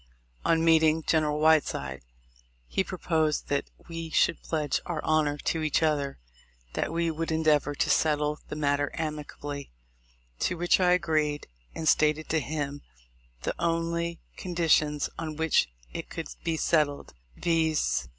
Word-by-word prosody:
On 165 Hz, 0 st, +2 dB
meeting 160 Hz, -1 st, +4 dB
General 150 Hz, -2 st, +1 dB
Whiteside, 145 Hz, -, +2 dB, 0.7 s
he 190 Hz, -, 0 dB
proposed 160 Hz, -5 st, -1 dB
that 140 Hz, 0 st, -1 dB, 0.2 s
we 165 Hz, -1 st, -5 dB
should 160 Hz, -, +2 dB
pledge 155 Hz, -3 st, -1 dB
our 170 Hz, -3 st, -2 dB
honor 155 Hz, -2 st, +2 dB
to 160 Hz, +2 st, -1 dB
each 155 Hz, +1 st, +1 dB
other 145 Hz, -3 st, 0 dB, 0.6 s
that -, -, -1 dB
we 165 Hz, 0 st, 0 dB
would 165 Hz, +1 st, -3 dB
endeavor 150 Hz, -2 st, +2 dB
to -, -, +1 dB
settle 150 Hz, -1 st, +2 dB
the -, -, -4 dB
matter 145 Hz, -1 st, +1 dB
amicably; 150 Hz, -2 st, -5 dB, 0.7 s
to 180 Hz, -, 0 dB
which 175 Hz, +2 st, +3 dB
I 180 Hz, -1 st, +4 dB
agreed, 155 Hz, -4 st, +1 dB, 0.3 s
and 160 Hz, -, -3 dB
stated 155 Hz, +1 st, +3 dB
to 160 Hz, -, +2 dB
him 145 Hz, -1 st, -3 dB, 0.6 s
the -, -, -1 dB
only 170 Hz, 0 st, -1 dB, 0.2 s
conditions 160 Hz, -4 st, +2 dB
on 155 Hz, -2 st, -4 dB
which 160 Hz, -, +2 dB, 0.2 s
it -, -, -6 dB
could -, -, -6 dB
be 165 Hz, -1 st, 0 dB
settled; 150 Hz, -3 st, +1 dB, 0.2 s
viz. 160 Hz, -, +1 dB
155 Hz, 140 wpm, -28 LUFS, 150-165 Hz, 0.7 s, meeting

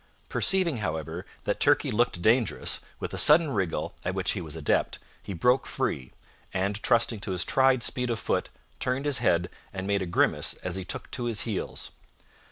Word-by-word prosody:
Perceiving, 185 Hz, -8 st, +2 dB
however, 80 Hz, -3 st, -4 dB, 0.2 s
that -, -, -1 dB
Turkey -, -, +3 dB
looked 105 Hz, -6 st, +1 dB
dangerous, 115 Hz, +3 st, +2 dB, 0.2 s
with -, -, -5 dB
a -, -, -2 dB
sudden 155 Hz, 0 st, +6 dB
wriggle, 95 Hz, -8 st, -1 dB
at -, -, -2 dB
which -, -, +1 dB
he -, -, -2 dB
was 80 Hz, -2 st, -5 dB
an 80 Hz, -, -6 dB
adept, 75 Hz, -, +1 dB, 0.2 s
he -, -, -8 dB
broke 125 Hz, +10 st, +2 dB
free, 65 Hz, -2 st, -2 dB, 0.4 s
and, 100 Hz, +3 st, -1 dB
trusting 115 Hz, -1 st, +2 dB
to 100 Hz, -, -4 dB
his 90 Hz, -1 st, 0 dB
tried 130 Hz, -2 st, +3 dB
speed 125 Hz, -2 st, 0 dB
of 115 Hz, -, 0 dB
foot, -, -, -1 dB, 0.3 s
turned 130 Hz, +3 st, -1 dB
his 145 Hz, -2 st, +1 dB
head 85 Hz, 0 st, +2 dB, 0.2 s
and 95 Hz, -1 st, -5 dB
made 100 Hz, 0 st, +1 dB
a 95 Hz, -, -2 dB
grimace 85 Hz, -, +2 dB
as 90 Hz, -1 st, -2 dB
he 95 Hz, -, -2 dB
took 90 Hz, -, -6 dB
to 125 Hz, -, -3 dB
his 115 Hz, -3 st, +1 dB
heels. 110 Hz, -5 st, -4 dB
105 Hz, 190 wpm, -27 LUFS, 90-125 Hz, 0.4 s, sudden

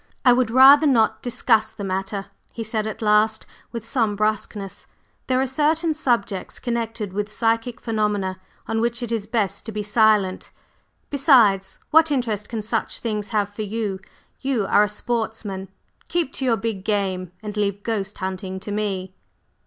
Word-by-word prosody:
"I 250 Hz, -, +8 dB
would 245 Hz, -2 st, +2 dB
rather 275 Hz, +5 st, +8 dB
not 230 Hz, -5 st, +3 dB
discuss 225 Hz, -3 st, +2 dB
the 220 Hz, -2 st, -8 dB
matter," 195 Hz, +1 st, -3 dB, 0.3 s
he 230 Hz, -, -5 dB
said 220 Hz, 0 st, -2 dB
at 220 Hz, -, -5 dB
last, 215 Hz, +1 st, +3 dB, 0.3 s
with 230 Hz, -2 st, -6 dB
some 230 Hz, -3 st, 0 dB
brusqueness. 210 Hz, -2 st, -2 dB, 0.4 s
"There 255 Hz, 0 st, +2 dB
are 265 Hz, -, +2 dB
certain 310 Hz, +5 st, +1 dB
subjects 235 Hz, -10 st, -1 dB
connected 225 Hz, -4 st, -3 dB
with 210 Hz, +1 st, -3 dB
psychic 230 Hz, +1 st, 0 dB
phenomena 210 Hz, -4 st, -1 dB, 0.3 s
on 225 Hz, 0 st, 0 dB
which 235 Hz, +1 st, -1 dB
it 235 Hz, -, -4 dB
is 220 Hz, -3 st, -2 dB
best 220 Hz, -3 st, -1 dB
to -, -, -4 dB
be 210 Hz, 0 st, -3 dB
silent; 210 Hz, -3 st, +2 dB, 0.6 s
besides, 240 Hz, -, +4 dB
what 320 Hz, +1 st, +6 dB
interest 230 Hz, -7 st, -1 dB
can 225 Hz, -2 st, -4 dB
such 225 Hz, +1 st, -1 dB
things 210 Hz, -3 st, -3 dB
have 205 Hz, -2 st, 0 dB
for 215 Hz, -, -5 dB
you? 210 Hz, -2 st, -3 dB, 0.4 s
You 265 Hz, -6 st, 0 dB
are 205 Hz, -, +4 dB
a 210 Hz, -, +2 dB
sportsman, 215 Hz, -3 st, -3 dB, 0.4 s
keep 335 Hz, -5 st, -1 dB
to 265 Hz, -, -3 dB
your 235 Hz, -3 st, +3 dB
big 205 Hz, -2 st, -3 dB
game, 190 Hz, -4 st, -1 dB
and 210 Hz, -1 st, -5 dB
leave 200 Hz, -1 st, -1 dB
ghost 205 Hz, -3 st, -3 dB
hunting 190 Hz, 0 st, -4 dB
to 205 Hz, -, -6 dB
me." 195 Hz, -3 st, -2 dB
215 Hz, 165 wpm, -23 LUFS, 200-235 Hz, 0.6 s, I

